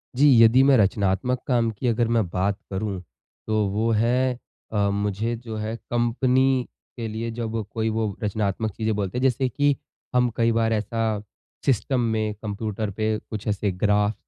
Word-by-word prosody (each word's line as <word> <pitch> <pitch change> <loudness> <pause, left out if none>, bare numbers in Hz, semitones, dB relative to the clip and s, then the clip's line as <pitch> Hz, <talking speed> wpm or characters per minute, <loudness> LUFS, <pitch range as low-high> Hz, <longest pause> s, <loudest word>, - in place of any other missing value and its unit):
जी, 145 +3 +5 0.2
यदि 115 +4 +6
मैं 135 -1 +6
रचनात्मक 100 +4 +1
काम 120 -3 +2
की 115 +4 -4
अगर 115 0 +2
मैं 110 -5 +2
बात 95 +3 0
करूँ, 95 -1 -2 0.5
तो 110 -1 +1
वो 110 +4 0
है 125 +3 +2 0.4
अ, 100 -1 +2
मुझे 105 +3 -1
जो 115 -1 -7
है 110 +1 -3 0.2
कंपनी 125 +2 +2 0.3
के 115 -2 -3
लिए 110 +2 -4
जब 115 -1 -3
कोई 110 0 0
वो 110 -3 -1
रचनात्मक 105 +1 -1
चीज़ें 110 +1 -1
बोलते 100 +2 -2
हैं, 125 - -1
जैसे 130 0 +2
कि 145 +3 +2 0.4
हम 125 0 +4
कई 115 0 +3
बार 115 0 +2
ऐसा 110 0 -1 0.4
सिस्टम 130 0 +1
में, 110 -2 0
कंप्यूटर 105 0 -4
पे 110 +2 -1
कुछ 110 -1 -5
ऐसे 100 -1 0
ग्राफ, 105 +2 +2
110 Hz, 170 wpm, -24 LUFS, 105-120 Hz, 0.5 s, यदि